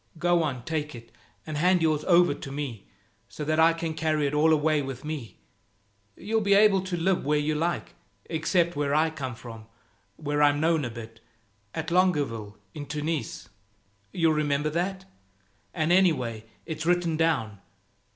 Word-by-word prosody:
Go 175 Hz, +1 st, +2 dB
on, 135 Hz, -6 st, -2 dB
take 150 Hz, -3 st, -3 dB
it, 115 Hz, 0 st, -12 dB, 0.3 s
and 155 Hz, -1 st, -4 dB
hand 180 Hz, +2 st, +3 dB
yours 155 Hz, -2 st, +1 dB
over 175 Hz, -3 st, +5 dB
to 135 Hz, -, -8 dB
me 135 Hz, -7 st, -5 dB, 0.4 s
so 150 Hz, -, -6 dB
that 155 Hz, +1 st, +1 dB
I 165 Hz, +1 st, +6 dB
can 165 Hz, -1 st, -3 dB
carry 155 Hz, -1 st, 0 dB
it 140 Hz, -, -1 dB
all 155 Hz, +2 st, +4 dB
away 155 Hz, -1 st, +2 dB
with 135 Hz, 0 st, -6 dB
me. 150 Hz, -7 st, -6 dB, 0.8 s
You'll 220 Hz, +2 st, -1 dB
be 200 Hz, -1 st, +3 dB
able 200 Hz, -2 st, +5 dB
to 185 Hz, -1 st, -4 dB
live 180 Hz, +2 st, +1 dB
where 150 Hz, +2 st, +1 dB
you 150 Hz, +1 st, 0 dB
like, 165 Hz, +2 st, -2 dB, 0.3 s
except 170 Hz, +1 st, 0 dB
where 145 Hz, 0 st, 0 dB
I 160 Hz, +1 st, +3 dB
come 130 Hz, -6 st, -5 dB
from, 115 Hz, -2 st, -11 dB, 0.5 s
where 145 Hz, -1 st, -2 dB
I'm 145 Hz, 0 st, +4 dB
known 160 Hz, -2 st, +2 dB
a -, -, -3 dB
bit, 115 Hz, -1 st, -10 dB, 0.6 s
at 160 Hz, +1 st, -4 dB
Longueville 145 Hz, -, +1 dB, 0.2 s
in 145 Hz, -2 st, -7 dB
Tunis. 150 Hz, -2 st, -4 dB, 0.6 s
You'll 165 Hz, -2 st, +2 dB
remember 150 Hz, 0 st, 0 dB
that? 185 Hz, +3 st, -2 dB, 0.7 s
And 160 Hz, -1 st, 0 dB
anyway, 130 Hz, -, +2 dB, 0.2 s
it's 160 Hz, 0 st, -5 dB
written 175 Hz, -2 st, +2 dB
down. 155 Hz, -11 st, 0 dB
155 Hz, 165 wpm, -27 LUFS, 145-170 Hz, 0.8 s, I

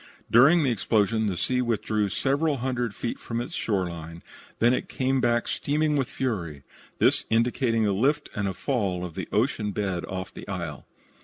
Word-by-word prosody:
During 145 Hz, +8 st, +7 dB
the 135 Hz, -, +2 dB
explosion 110 Hz, 0 st, +1 dB
the 95 Hz, -3 st, -2 dB
sea 125 Hz, +9 st, +1 dB
withdrew 110 Hz, -3 st, 0 dB
several 140 Hz, -, +1 dB
hundred 120 Hz, -4 st, -2 dB
feet 120 Hz, -, -4 dB
from 115 Hz, 0 st, -4 dB
its 120 Hz, -, -5 dB
shore 95 Hz, -5 st, 0 dB
line, 85 Hz, 0 st, -8 dB, 0.4 s
and 120 Hz, +2 st, +5 dB
then -, -, +1 dB
came 130 Hz, 0 st, 0 dB
back 120 Hz, -1 st, +2 dB
steaming 150 Hz, +1 st, 0 dB
with 135 Hz, -4 st, 0 dB
fury; 85 Hz, -, -3 dB, 0.3 s
this -, -, +3 dB
indicating 115 Hz, 0 st, +2 dB
a 100 Hz, -, +2 dB
lift 140 Hz, +9 st, +1 dB
and 100 Hz, -2 st, -2 dB
fall 100 Hz, -10 st, -1 dB
of 85 Hz, -, -7 dB
the -, -, -5 dB
ocean 105 Hz, -2 st, +1 dB
bed 95 Hz, -4 st, -2 dB
off 95 Hz, 0 st, -5 dB
the -, -, -10 dB
isle. 85 Hz, -7 st, -5 dB
115 Hz, 175 wpm, -26 LUFS, 95-130 Hz, 0.4 s, During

